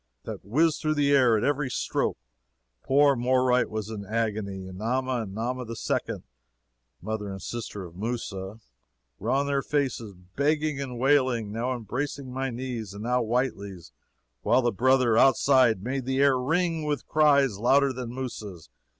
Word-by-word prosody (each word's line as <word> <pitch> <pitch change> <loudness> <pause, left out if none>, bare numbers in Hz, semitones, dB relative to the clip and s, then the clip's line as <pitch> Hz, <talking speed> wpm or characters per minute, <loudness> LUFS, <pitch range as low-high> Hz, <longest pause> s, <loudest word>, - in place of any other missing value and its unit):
] - - -51
that - - -7
whizzed 155 - +1
through 155 -1 0
the 145 -1 +2
air 125 -5 +5
at 105 - -1
every 145 -1 0
stroke. 125 - -1 0.6
Poor 140 +1 +4
Moreright 125 0 +2
was 110 0 -4
in 105 -2 -5
agony, 105 -3 -2
and 95 0 -9
Nama 130 +2 -1
and 100 -3 -7
Nama 125 +3 -2
the 115 -1 -7
Second - - -2 0.8
(mother 110 -2 -3
and 95 0 -6
sister 110 -2 -6
of 85 -1 -12
Mousa,) 105 -1 -4 0.6
were - - -4
on 140 +1 +2
their 140 -1 0
faces 130 -8 -2 0.2
begging 150 0 0
and 125 -3 -5
wailing, 130 -5 +2
now 120 +4 -2
embracing 130 +3 -4
my 135 +1 -2
knees 120 -4 -5
and 105 - -7
now 125 +1 +1
Whitely's, 100 - -2 0.5
while 130 - +3
the 120 - +2
brother, 125 0 +3
outside, 130 -6 +4
made 130 +2 -3
the 130 0 -1
air 140 -1 +5
ring 160 +5 0
with 150 -3 -2
cries 140 -8 +3
louder 135 +4 +3
than 125 -2 -6
Mousa's. 105 - -7
125 Hz, 165 wpm, -26 LUFS, 110-135 Hz, 0.8 s, air